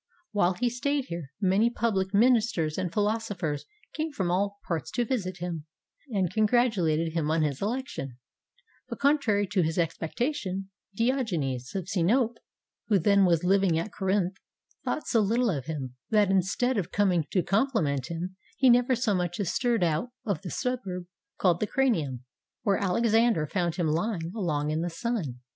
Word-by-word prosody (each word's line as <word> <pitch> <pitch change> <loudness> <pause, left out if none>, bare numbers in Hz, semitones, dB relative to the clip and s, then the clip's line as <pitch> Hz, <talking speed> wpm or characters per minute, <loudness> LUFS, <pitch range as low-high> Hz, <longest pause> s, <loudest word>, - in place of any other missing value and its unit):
While 195 -4 +2
he 245 +7 0
stayed 265 +3 -1
here, 165 -5 -6
many 200 +3 +3
public 205 -5 0
minis 235 +2 +4
ters 155 -2 -1
and 185 -2 -2
philosophers 205 -7 -1 0.3
came 315 +1 -2
from 190 -10 -1
all 200 +2 0
parts 165 -3 -2
to 240 - +1
visit 195 -8 -2
him, 165 -3 -5 0.4
and 190 -6 0
congratulated 205 -9 +2
him 160 -3 0
on 160 0 +2
his 140 -3 -2
election, 205 - -3 0.7
but - - -5
contrary 275 -8 +2
to 195 -3 +3
his 160 +1 -1
expectation, 190 - -2 0.2
Diogenes 180 - -1
of 190 -2 -3
Sinope, 225 +6 +1 0.5
who 210 - +4
then 200 +2 +4
was 170 -2 +3
liv 195 +2 +3
ing 170 -4 +3
at 170 +6 -3
Corinth, 190 -1 0 0.5
thought 310 - -2
so 230 - +2
little 230 +3 +2
of 140 -6 -3
him, 135 -5 -5
that 210 -3 +3
instead 195 +6 +1
of 180 -3 -3
comJng 180 -7 +1
to 185 - +1
compliment 175 - +1
him, 175 +3 -5 0.2
he 260 -2 +6
nevei 245 +1 +4
so 230 -3 +1
much 175 -1 -1
as 195 -5 -1
stirred 240 -6 +1
out 165 +8 0 0.2
of 200 -7 -1
the 190 - -6
suburb 200 -9 -3 0.3
called 175 -3 +2
the 215 - 0
Cranium, 160 - 0 0.4
where 200 -1 +2
Alexander 225 -2 +2
found 175 +1 -1
him 175 -2 0
lying 165 +2 -1
along 150 -8 -1
in 155 +1 0
the 175 - -1
sun. 165 - -3
190 Hz, 170 wpm, -28 LUFS, 165-230 Hz, 0.7 s, he